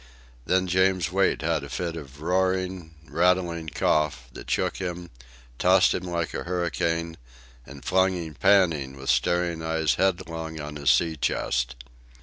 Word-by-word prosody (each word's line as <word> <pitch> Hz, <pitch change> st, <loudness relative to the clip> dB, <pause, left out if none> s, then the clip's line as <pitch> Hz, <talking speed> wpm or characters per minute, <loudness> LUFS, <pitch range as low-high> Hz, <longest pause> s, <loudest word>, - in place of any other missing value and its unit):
Then 95 Hz, 0 st, +2 dB
James 95 Hz, -1 st, +2 dB
Wait 95 Hz, -3 st, +1 dB
had 80 Hz, -3 st, 0 dB
a 70 Hz, -, -8 dB
fit 85 Hz, +3 st, -3 dB
of 75 Hz, -2 st, -10 dB
roaring, 95 Hz, -1 st, -1 dB
rattling 85 Hz, -2 st, +1 dB
cough, 75 Hz, -4 st, 0 dB
that -, -, -10 dB
shook -, -, 0 dB
him, 90 Hz, -2 st, -5 dB, 0.5 s
tossed -, -, +5 dB
him 90 Hz, -, -3 dB
like 85 Hz, -2 st, -2 dB
a -, -, -3 dB
hurricane, 85 Hz, -2 st, -1 dB, 0.5 s
and 70 Hz, 0 st, -12 dB
flung 95 Hz, +1 st, +3 dB
him 85 Hz, -3 st, -5 dB
panting 85 Hz, -9 st, +2 dB
with 65 Hz, 0 st, 0 dB
staring 85 Hz, -2 st, +1 dB
eyes 80 Hz, -1 st, +1 dB
headlong 80 Hz, -4 st, -1 dB
on 75 Hz, 0 st, -6 dB
his 70 Hz, -1 st, +1 dB
sea 80 Hz, +5 st, +3 dB
chest. 60 Hz, -3 st, -1 dB
85 Hz, 145 wpm, -26 LUFS, 75-90 Hz, 0.5 s, tossed